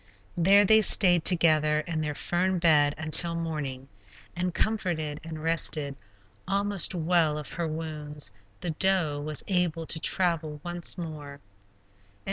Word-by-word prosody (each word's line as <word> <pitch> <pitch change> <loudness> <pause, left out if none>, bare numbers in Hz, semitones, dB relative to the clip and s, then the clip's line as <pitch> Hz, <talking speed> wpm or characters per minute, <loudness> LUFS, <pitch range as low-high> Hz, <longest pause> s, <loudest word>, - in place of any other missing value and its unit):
There 195 +4 +4
they 220 +2 +5
stayed 180 -5 +5
together 155 -3 +3
in 160 0 -4
their 150 -1 -4
fern 185 +4 -1
bed 150 -4 +3
until 160 +2 +3
morning, 150 -6 -5 0.5
and 180 +1 -2
comforted 170 -8 -2
and 160 -1 -8
rested, 155 -3 0 0.5
almost 200 -1 +1
well 165 -2 +1
of 150 - -7
her 170 -1 -4
wounds, 150 -5 -5 0.3
the 175 - -3
doe 160 -4 0
was 155 0 -5
able 175 -4 -1
to 160 - -2
travel 165 -4 0
once 175 +1 -3
more. 150 -4 -8
165 Hz, 130 wpm, -26 LUFS, 150-175 Hz, 0.5 s, they